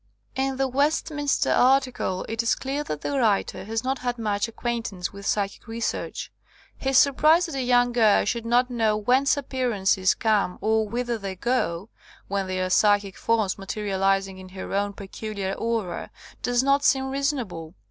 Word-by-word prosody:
In 265 0 -1
the 270 0 +1
Westminster 290 +2 0
article 255 -7 +2
it 225 +1 -1
is 230 - +2
clear 275 +2 -3
that 150 -1 -4
the 280 -1 -1
writer 205 -4 +1
has 225 +2 -2
not 265 0 -1
had 245 -1 -2
much 210 -1 -1
acquaintance 230 -6 -4
with 200 0 -7
psychic 205 +2 -2
research. 230 +1 -4 0.4
His 270 -1 +1
surprise 305 +5 +5
that 325 - -6
a 270 - -2
young 245 -1 +3
girl 225 -4 +4
should 235 +2 -1
not 245 +2 +2
know 220 -3 +1
whence 260 +7 +2
appear 260 -2 -2
ances 190 -3 +2
come 210 -5 +1
or 220 0 +1
whither 240 0 -2
they 195 -2 -5
go, 200 -4 -1 0.4
when 200 -1 -2
they 185 0 -2
are 185 0 -1
psychic 205 -1 +3
forms 220 -5 0
materializing 195 -1 -1
in 185 0 -11
her 185 +1 -7
own 200 +1 0
peculiar 200 0 -5
aura, 225 -6 -3 0.3
does 245 0 +1
not 275 +1 +3
seem 265 -1 +2
reasonable. 245 - -3
225 Hz, 170 wpm, -25 LUFS, 195-260 Hz, 0.4 s, surprise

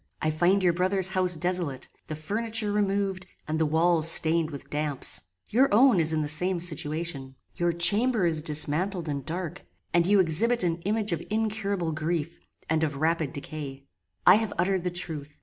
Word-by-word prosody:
I 155 - 0
find 180 +5 +2
your 175 -2 +3
brother's 185 +1 0
house 185 -2 +3
desolate: 175 -5 -3 0.2
the 155 - -5
furniture 215 +6 -1
removed, 195 -2 -1 0.2
and 155 +1 -2
the 160 - +2
walls 165 +1 +3
stained 165 0 +4
with 140 -2 -9
damps. 150 -2 -1 0.3
Your 260 +5 +3
own 235 -1 +5
is 160 -1 +3
in 155 -1 0
the - - -3
same 180 +5 0
situation. 155 -4 -1 0.2
Your 175 0 0
chamber 200 +6 +2
is 160 -2 0
dismantled 160 +4 -1
and 140 -2 -3
dark, 170 +1 -5 0.3
and 170 0 +3
you 205 0 +4
exhibit 190 +8 +2
an 170 -1 -1
image 215 0 0
of 165 -1 -2
incurable 205 -5 -1
grief, 155 +1 -3 0.3
and 160 0 0
of 150 -2 -1
rapid 160 0 0
decay. 140 -1 -8 0.4
"I - - +8
have 220 -1 -3
uttered 185 +1 0
the - - +1
truth. 155 -5 -5
170 Hz, 175 wpm, -26 LUFS, 155-195 Hz, 0.4 s, I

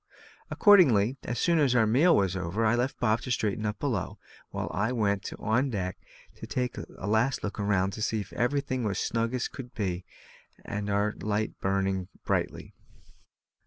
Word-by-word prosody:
Accordingly, 135 - +5
as 120 - -3
soon 170 +6 +2
as 135 -4 +3
our 115 -2 +5
meal 145 +11 +4
was 95 -2 +1
over, 95 +5 -1
I 110 - +4
left 125 +3 -1
Bob 115 -1 +2
to 125 - -7
straighten 110 -3 0
up 105 0 -3
below, 115 -10 -2 0.3
while - - -4
I 105 +6 0
went 100 -5 0
on 120 +6 +1
deck 95 -6 -3 0.4
to - - -8
take 125 -1 -2
a - - -9
last 110 +5 +1
look 105 +1 -4
round 100 -1 +1
and 110 - -4
see 110 -1 0
that 90 -2 -17
everything 130 +2 0
was 100 -3 -1
snug 115 +2 0
and 125 - -4
as 125 - -1
it - - -5
should 125 -2 -9
be, 95 -4 -2 0.6
and 105 0 -4
our 100 +1 +1
light 105 +1 -1
burning 95 -1 0 0.2
brightly. - - -2
110 Hz, 185 wpm, -28 LUFS, 100-125 Hz, 0.6 s, Accordingly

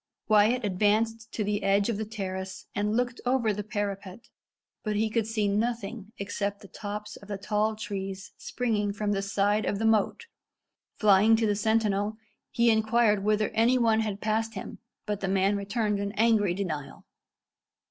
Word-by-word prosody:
Wyat 215 +3 +4
advanced 220 +3 +1
to 215 - -1
the 205 0 -1
edge 200 +1 +2
of 230 -4 -1
the 220 - -3
terrace 190 -3 -5
and 210 +1 0
looked 245 0 -1
over 245 -4 +2
the 210 +1 -4
parapet, 205 0 -5 0.5
but 215 -1 -1
he 215 +1 +1
could 225 -1 0
see 220 -2 0
nothing 215 0 -2
except 200 0 -3
the 200 - -12
tops 210 +1 -6
of 200 - -14
the 205 -1 -4
tall 210 +2 0
trees 195 -2 -5
springing 210 -5 -1
from 205 0 -1
the 195 -1 0
side 205 +2 +1
of 200 - -1
the 225 - -1
moat. 220 - +2 0.7
Flying 210 +1 +5
to 225 0 +1
the 205 -1 +2
sentinel, 215 -1 +1 0.3
he 235 0 +3
inquired 220 -2 +3
whether 215 0 +2
any 235 +3 +3
one 225 -2 +3
had 210 -2 -2
passed 225 +1 -1
him, 190 - -7 0.3
but 210 -2 -2
the 195 - -2
man 195 +1 +2
returned 205 +1 -1
an 200 0 -3
angry 215 -4 +3
denial. 160 -8 -5
210 Hz, 170 wpm, -28 LUFS, 200-225 Hz, 0.7 s, Flying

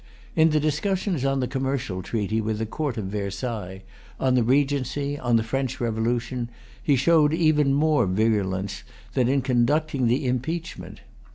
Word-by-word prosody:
In 160 0 +5
the 155 -1 +2
discussions 170 +2 0
on 135 -1 +1
the 125 - 0
Commercial 130 -8 -2
Treaty 110 +1 -1
with 110 0 -2
the 110 - -2
Court 140 +2 -3
of 105 - -3
Versailles, 100 -1 -4 0.4
on 130 -1 +2
the 125 - +4
Regency, 140 +2 0
on 120 -2 +1
the 115 - +3
French 130 +2 -2
Revolution, 120 +1 -1 0.3
he 145 - +3
showed 150 +2 +4
even 155 -4 +3
more 150 -5 +3
virulence 95 -1 0 0.3
than 125 -3 +2
in 135 0 +2
conducting 135 +2 +1
the 125 +4 +1
impeachment. 155 +8 -3
130 Hz, 155 wpm, -25 LUFS, 110-145 Hz, 0.4 s, In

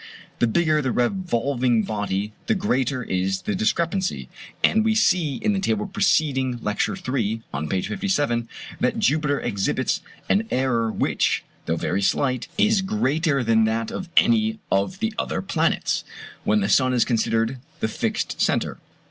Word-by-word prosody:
The 120 - +3
bigger 155 +5 +2
the 130 -3 -1
revolving 125 - +1
body 105 0 -2
the 220 - +2
greater 130 - 0
is 95 -1 -1
the 215 - -1
discrepancy: 185 - -1 0.3
and 220 0 +4
we 220 0 +2
see 175 -9 +2
in 215 -1 0
the 195 - 0
table 210 +2 0
preceding 145 -10 +1
Lecture 105 - -1
III., 115 - -2
on 75 +2 -3
page 95 +2 -1
57, 120 - 0 0.3
that - - +1
Jupiter 145 0 +1
exhibits 100 -1 -1 0.3
an 215 +3 +2
error 120 -4 +1
which, - - 0 0.2
though 80 - +1
very 95 +4 -1
slight, 125 +6 0
is 215 -2 +3
greater 160 -8 +1
than 110 -1 +3
that 110 0 -1
of 190 -2 -5
any 220 -1 +4
of 100 - 0
the 225 0 0
other - - -2
planets, 165 -4 0 0.4
when 105 0 +3
the 100 - +1
sun 130 -1 +4
is 120 - +3
considered 115 +1 0 0.2
the - - 0
fixed 110 - -2
centre. - - 0
130 Hz, 155 wpm, -23 LUFS, -, 0.4 s, and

